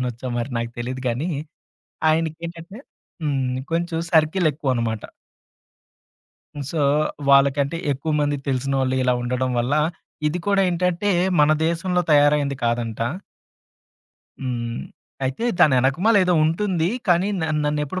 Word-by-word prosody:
తాతయ్యనొచ్చో 125 0 -4
మరి 120 +3 -3
నాకు 115 0 -3
తెలీదు 130 +2 -4
గానీ, 130 +9 -2 0.8
ఆయనకేంటంటే 165 +4 -3 0.4
హ్మ్. 135 -4 0 0.2
కొంచుం 170 0 -1
సర్కిలెక్కువనమాట. 145 - +1 1.7
సో, 160 - -2 0.5
వాళ్ళకంటే, 140 +2 +4 0.2
ఎక్కువమంది 145 +1 0
తెలిసినోళ్ళు 135 0 0
ఇలా 125 0 +2
ఉండడం 125 +1 -1
వల్లా 140 +6 +1 0.5
ఇది 170 - -2
కూడా 200 -1 +3
ఏంటంటే, 180 +3 0 0.3
మన 150 - +5 0.2
దేశంలో 180 +2 0
తయారైంది 145 -1 +3
కాదంట. 115 -1 -1 1.4
హ్మ్. 120 -2 -3 0.4
అయితే 135 - -2
దాని 140 -4 +6
వెనకమాలే 175 - +3
ఏదో 180 -1 +2
ఉంటుంది. 170 +1 0 0.2
కానీ 175 +3 +3
న - - 0 0.2
నన్నెప్పుడూ 150 +4 -1
145 Hz, 105 wpm, -22 LUFS, 130-170 Hz, 1.7 s, దాని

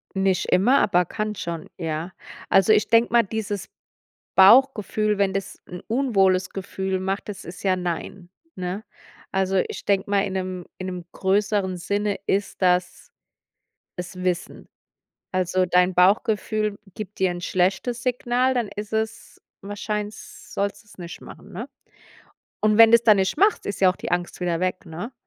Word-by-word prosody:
Nicht 190 -1 +1
immer, 245 +9 +4
aber 180 -2 +3
kann 215 +4 -3
schon, 170 -4 -5
ja. 165 +1 -4 0.4
Also, 195 +3 +5
ich 210 - +3
denke 230 +1 +4
mal, 235 -1 +6
dieses 205 -2 -4 0.7
Bauchgefühl, 215 -1 +5
wenn 200 -1 +2
das 195 -1 -4
'n 180 0 -8
unwohles 195 -7 +2
Gefühl 190 0 -3
macht, 195 +2 -3
das 200 - -7
ist 170 +2 -9
ja 190 -2 +2
nein, 175 +1 -5 0.3
ne? 185 +3 -4 0.5
Also, 190 0 +1
ich - - -8
denk 195 -1 +1
mal, 200 -1 +2
in 190 - -5
'nem 185 -2 -4
in 185 - -4
'nem 180 -2 -6
größeren 195 -1 0
Sinne 205 +3 -1
ist 200 +1 -1
das 180 0 +1 0.9
es 180 0 -7
Wissen. 180 -1 -3 0.7
Also, 185 0 +1
dein 180 +1 +3
Bauchgefühl 210 +3 +2 0.2
gibt 210 -1 -8
dir 190 -1 +2
'n 175 0 -6
schlechtes 190 +8 0
Signal, 250 +1 +1
dann 240 -5 -1
ist 210 +1 -7
es 220 0 -4 0.2
wahrscheins 210 +1 -6
sollst 200 +3 -2
du's 210 - -19
nicht 175 -1 -8
machen, - - -13
ne? 225 +8 -6 0.9
Und 215 0 +2
wenn 225 -1 +9
du's 235 0 +6
dann 215 -3 +7
nicht 190 -1 0
machst, 415 +2 +3
ist 200 - -4
ja 190 -1 +6
auch 180 - -5
die - - -6
Angst 175 0 -2
wieder 175 -2 0
weg, 185 0 -2
ne? 175 +10 -7
195 Hz, 160 wpm, -23 LUFS, 180-215 Hz, 0.9 s, wenn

